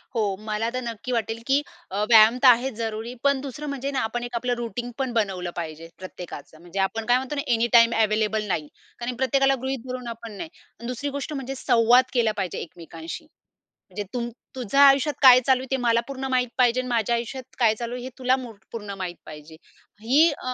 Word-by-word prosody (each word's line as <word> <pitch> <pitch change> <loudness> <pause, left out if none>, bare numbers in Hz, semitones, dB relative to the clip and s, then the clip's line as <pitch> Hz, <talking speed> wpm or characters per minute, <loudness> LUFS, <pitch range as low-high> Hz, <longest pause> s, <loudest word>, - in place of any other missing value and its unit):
हो. 205 -4 0
मला 215 +2 -1
तर 255 - -2
नक्की 235 +1 -5
वाटेल, 230 -1 -2
की 275 +2 +3 0.3
अ, 205 +2 -1
व्यायाम 225 +1 +7
तर - - +8
आहेच 250 +1 +5
जरुरी 225 +1 -4
पण 280 -1 +2
दुसरं 285 +2 -7
म्हणजे 280 0 -3
ना, 270 - -1
आपण 240 +2 -2
एक 240 0 -6
आपलं 245 +1 0
रुटीन 240 +1 -4
पण 265 -3 -2
बनवलं 190 -5 -1
पाहिजे 165 -1 -6
प्रत्येकाचं. 175 -4 -9
म्हणजे 175 +3 -7
आपण 220 +3 -1
काय 245 +1 +4
म्हणतो 265 +3 -4
ना, 280 - -1
एनीटाईम 230 0 +5
अवेलेबल 215 0 +1
नाही. 155 -6 -2 0.3
कारण 245 +1 -3
प्रत्येकाला 270 +2 +2
गृहीत 265 -2 -3
धरून 250 -1 -5
आपण 230 -1 -7
नाही. 320 - -6 0.4
दुसरी 255 +3 -3
गोष्ट 300 +2 -5
म्हणजे 270 -1 -5
संवाद 245 0 +4
केला 230 -3 +2
पाहिजे 185 -3 -3
एकमेकांशी. 165 - -9 0.6
म्हणजे 205 - -5
तुम 240 -1 -2 0.3
तुझ्या 260 +3 +1
आयुष्यात 280 +1 +6
काय 255 -2 +9
चालू 260 -1 +4
आहे 260 - -8
ते 265 - +2
मला 235 -1 +3
पूर्ण 270 -1 -5
माहीत 255 -1 +1
पाहिजे 245 -1 +3
आणि 255 - -7
माझ्या 235 -1 +1
आयुष्यात 245 +2 -6
काय 225 -3 +4
चालू 235 +2 -5
आहे 245 - -6
हे 255 - -5
तुला 255 0 +2
मुरक 225 -6 -10
पूर्ण 210 -3 -6
माहित 180 -2 -4
पाहिजे. 155 +1 -11 0.5
ही 285 +9 +5
अ 255 -3 -5
240 Hz, 205 wpm, -24 LUFS, 215-260 Hz, 0.6 s, काय